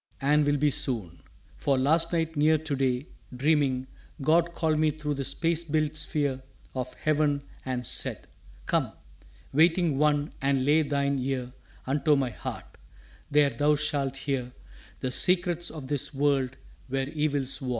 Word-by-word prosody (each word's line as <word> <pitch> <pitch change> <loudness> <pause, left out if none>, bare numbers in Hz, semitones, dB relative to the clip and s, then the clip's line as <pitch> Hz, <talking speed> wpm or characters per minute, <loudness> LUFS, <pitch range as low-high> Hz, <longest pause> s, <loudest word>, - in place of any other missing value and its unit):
4 140 - -1
And 150 0 +4
will 145 0 +3
be 145 +1 +2
soon! 105 -12 -1 0.4
For 140 -2 +1
last 160 +5 +2
night 165 -1 0
near 155 +2 +4
to 155 -1 -3
day, 130 0 0 0.3
Dreaming, 135 -2 +2 0.3
God 170 +4 +2
called 155 -2 +1
me 155 0 +4
thro' 150 0 -3
the 140 -1 -3
space 165 +4 0
built 155 -1 0
sphere 145 -3 -1 0.3
Of 125 -1 -4
heaven 150 -2 +1 0.2
and 125 -1 -2
said, - - -3 0.4
"Come, - - 0 0.6
waiting 165 -1 +3
one, 150 -1 +2
and 135 -1 +1
lay 150 +3 +5
Thine 140 -2 0
ear 125 -1 -3 0.3
unto 145 +3 +2
my 135 -3 0
Heart - - -7 0.5
there 145 -1 +4
thou 145 +5 +2
shalt 145 -3 -1
hear 130 -3 -3 0.5
The 130 - -1
secrets 175 +3 +1
of 150 -4 -8
this 145 -1 0
world 135 -2 +1 0.3
where 135 0 -1
evils 145 -3 -1
war." 130 - -3
145 Hz, 155 wpm, -28 LUFS, 135-155 Hz, 0.6 s, lay